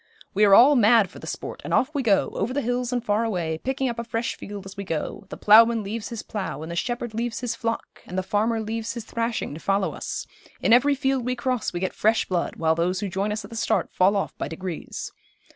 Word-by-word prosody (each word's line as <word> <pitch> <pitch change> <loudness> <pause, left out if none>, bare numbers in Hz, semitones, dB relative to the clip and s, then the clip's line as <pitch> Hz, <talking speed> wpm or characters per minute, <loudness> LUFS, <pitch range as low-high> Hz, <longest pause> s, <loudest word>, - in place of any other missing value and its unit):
We 210 +2 +4
are 195 -1 +7
all 275 +7 +8
mad 220 -5 +5
for - - -11
the - - -10
sport, - - -6
and - - 0
off 265 +4 +2
we 285 - 0
go, 210 -6 +3
over 235 +7 -2
the 285 - 0
hills 245 +1 -1
and 245 -1 -2
far 210 +1 +2
away, 170 -8 -2
picking 265 +4 -1
up 235 -1 -3
a - - -2
fresh 230 0 -2
field 200 -1 -8
as 195 - -9
we 200 - -5
go. 180 +3 -4
The - - -7
ploughman 225 +1 +6
leaves 215 +2 -4
his 230 -3 -6
plough, 175 -8 -4
and 160 - -6
the - - -4
shepherd 240 +4 -2
leaves 235 +1 -2
his 245 -2 -1
flock, 230 0 -4
and 180 - -6
the 185 - 0
farmer 220 +4 +1
leaves 225 +1 -3
his 235 -2 -6
thrashing, 230 -7 -2
to 155 - -7
follow 195 +2 0
us; - - -5 0.3
in - - +3
every 280 +4 +5
field 270 -2 0
we 250 +1 -1
cross 250 -1 -1
we 175 - -3
get 185 +1 -2
fresh 220 +1 +2
blood, 175 -2 -1
while 160 -1 +2
those 175 +3 0
who 205 - -2
join 195 +2 -1
us 210 -1 -3
at 200 - -13
the - - -7
start 225 - 0
fall 190 +3 +4
off 195 - -2
by - - -2
degrees. 165 +2 -6
220 Hz, 255 wpm, -25 LUFS, 195-240 Hz, 0.3 s, all